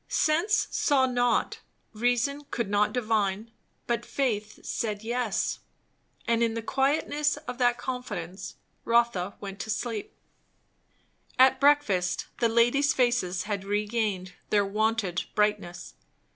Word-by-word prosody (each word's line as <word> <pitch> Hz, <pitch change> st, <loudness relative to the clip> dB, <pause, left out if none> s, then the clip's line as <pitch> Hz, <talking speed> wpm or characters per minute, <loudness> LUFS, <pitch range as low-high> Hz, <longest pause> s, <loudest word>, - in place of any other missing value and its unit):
Sense 340 Hz, +8 st, +2 dB
saw 270 Hz, -3 st, +3 dB
not, 245 Hz, -2 st, +1 dB, 0.3 s
reason 245 Hz, +6 st, 0 dB
could 230 Hz, -4 st, -3 dB
not 210 Hz, +1 st, +3 dB
divine; 220 Hz, -2 st, -1 dB, 0.3 s
but 235 Hz, -1 st, -1 dB
faith 215 Hz, -6 st, -2 dB
said 210 Hz, -2 st, -3 dB
"yes"; 235 Hz, -2 st, -1 dB, 0.7 s
and 230 Hz, 0 st, +2 dB
in 230 Hz, -1 st, +1 dB
the 230 Hz, -, -3 dB
quietness 290 Hz, +3 st, +1 dB
of 295 Hz, -4 st, -7 dB
that 245 Hz, -1 st, +3 dB
confidence 190 Hz, -8 st, -5 dB, 0.3 s
Rotha 230 Hz, -5 st, +1 dB
went 195 Hz, -1 st, -7 dB
to 220 Hz, -, -5 dB
sleep. 225 Hz, -1 st, -3 dB, 1.2 s
At 260 Hz, 0 st, +6 dB
breakfast 275 Hz, -11 st, +2 dB
the 235 Hz, -, +3 dB
ladies' 240 Hz, +5 st, +3 dB
faces 240 Hz, -8 st, +1 dB
had 205 Hz, -2 st, -3 dB
regained 205 Hz, -2 st, -1 dB, 0.2 s
their 205 Hz, -1 st, +3 dB
wonted 210 Hz, -3 st, 0 dB
brightness. 210 Hz, -4 st, -1 dB
230 Hz, 115 wpm, -27 LUFS, 205-250 Hz, 1.2 s, At